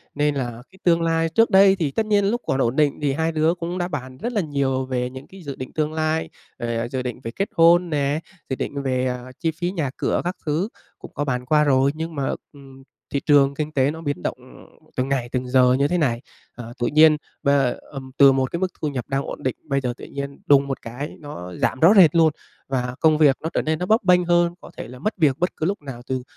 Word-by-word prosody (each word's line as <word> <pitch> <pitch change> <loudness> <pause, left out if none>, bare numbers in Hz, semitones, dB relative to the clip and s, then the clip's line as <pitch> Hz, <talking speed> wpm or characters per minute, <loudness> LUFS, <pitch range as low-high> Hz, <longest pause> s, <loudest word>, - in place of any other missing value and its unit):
nên 145 0 +1
là 120 -3 -4
cái 190 - -20
tương 170 -1 +3
lai 165 0 +1
trước 225 +8 +3
đây 195 -1 +6
thì 160 -7 -1
tất 220 +9 -1
nhiên 205 -2 +2
lúc 235 +5 0
còn 130 - 0
ổn 120 +1 +1
định 145 -2 +2
thì 140 -2 +1
hai 160 +3 0
đứa 160 +1 +2
cũng 175 0 -5
đã 175 -1 -1
bàn 130 -6 -6
rất 240 - -4
là 210 - +1
nhiều 140 -4 -1
về 125 -1 -2
những 130 +2 -10
cái 190 0 -13
dự 140 -3 -6
định 130 - -8
tương 155 0 -1
lai, 160 0 -1 0.3
về 115 -1 -2
dự 130 - -2
định 125 -1 -5
về 115 - -4
kết 195 - -2
hôn 170 +1 +5
nè, 145 -1 0 0.3
dự 130 - -1
định 140 +2 -4
về, 130 -1 0
ờ, 125 0 -4
chi 165 -1 0
phí 175 +3 -3
nhà 160 -8 -2
cửa - - 0
các 180 +2 -2
thứ 160 +7 0 0.3
cũng - - -11
có 145 - -2
bàn 125 -2 -2
qua 150 +3 +3
rồi 135 -1 +3
nhưng 160 +1 -5
mà, 140 -2 -1 0.2
ừm, 135 -2 -15 0.3
thị 140 - +1
trường 140 -2 +5
kinh 150 +1 -3
tế 140 -1 +2
nó 160 +1 -8
biến 145 - -3
động, - - -2
ừm, - - -17 0.2
từng 130 +1 -1
ngày, 130 -3 -1
từng 125 0 -2
giờ 125 0 +4
như 140 +2 +2
thế 180 - 0
này, 120 -8 0 0.3
ờ, 120 -1 -9
tự 120 - +1
nhiên 155 +2 +6 0.3
và 140 -4 +2 0.2
ừm, 130 -2 -8
từ 140 -1 +8
một 130 -1 0
cái 170 - -2
mức 185 - +1
thu 155 - 0
nhập 130 -5 -4
đang 135 0 -1
ổn - - -7
định, 130 - -1
bây 140 -3 -1
giờ 125 -2 -2
tự - - -10
nhiên 140 0 -6
đùng 140 -1 +5
một 135 - -4
cái 125 +6 -7
nó 90 - -8
giảm 130 - -1
rõ 165 +7 +7
rệt 175 -4 +7
luôn 160 -2 +4 0.3
và 125 -2 -2
công 155 -1 +4
việc 145 -3 +4
nó 160 - -3
trở - - +1
nên 155 0 -1
nó 180 - -1
bấp 220 +4 +3
bênh 180 -1 +4
hơn, 175 0 +3
có - - -12
thể - - -6
là 125 +1 -11
mất 215 - -2
việc 145 -6 +3
bất 180 - -1
cứ 155 - -1
lúc 195 +1 -1
nào 135 -4 -8
từ 130 -1 -2
145 Hz, 265 wpm, -22 LUFS, 130-165 Hz, 0.3 s, từ